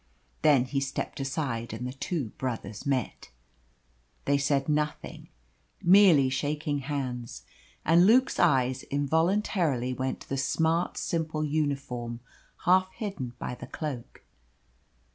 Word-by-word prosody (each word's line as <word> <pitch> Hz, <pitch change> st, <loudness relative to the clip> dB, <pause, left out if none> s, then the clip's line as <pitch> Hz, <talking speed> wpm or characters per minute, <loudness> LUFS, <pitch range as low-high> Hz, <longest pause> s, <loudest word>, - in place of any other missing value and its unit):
Then 140 Hz, -5 st, +5 dB
he 135 Hz, +2 st, -1 dB
stepped 135 Hz, +2 st, -4 dB
aside, 130 Hz, -5 st, -3 dB
and 115 Hz, +3 st, -5 dB
the 125 Hz, -, -4 dB
two 140 Hz, -, -3 dB
brothers 115 Hz, -3 st, -4 dB
met. 130 Hz, -4 st, -2 dB, 1.0 s
They 140 Hz, 0 st, +2 dB
said 140 Hz, -1 st, +1 dB
nothing, 150 Hz, 0 st, -2 dB, 0.5 s
merely 175 Hz, -7 st, +6 dB
shaking 145 Hz, +2 st, -1 dB
hands, 130 Hz, -4 st, -4 dB, 0.4 s
and 170 Hz, +3 st, +6 dB
Luke's 255 Hz, +4 st, +4 dB
eyes 130 Hz, -5 st, +3 dB
involuntarily 160 Hz, -, +1 dB
went 130 Hz, +1 st, -3 dB
to -, -, -13 dB
the 135 Hz, -, -1 dB
smart, 160 Hz, +5 st, +1 dB
simple 160 Hz, -2 st, -2 dB
uniform 140 Hz, -6 st, -2 dB, 0.5 s
half 185 Hz, +1 st, +4 dB
hidden 195 Hz, -, -5 dB
by -, -, -4 dB
the 125 Hz, -, -9 dB
cloak. 140 Hz, -7 st, -6 dB
140 Hz, 120 wpm, -28 LUFS, 130-160 Hz, 1.0 s, merely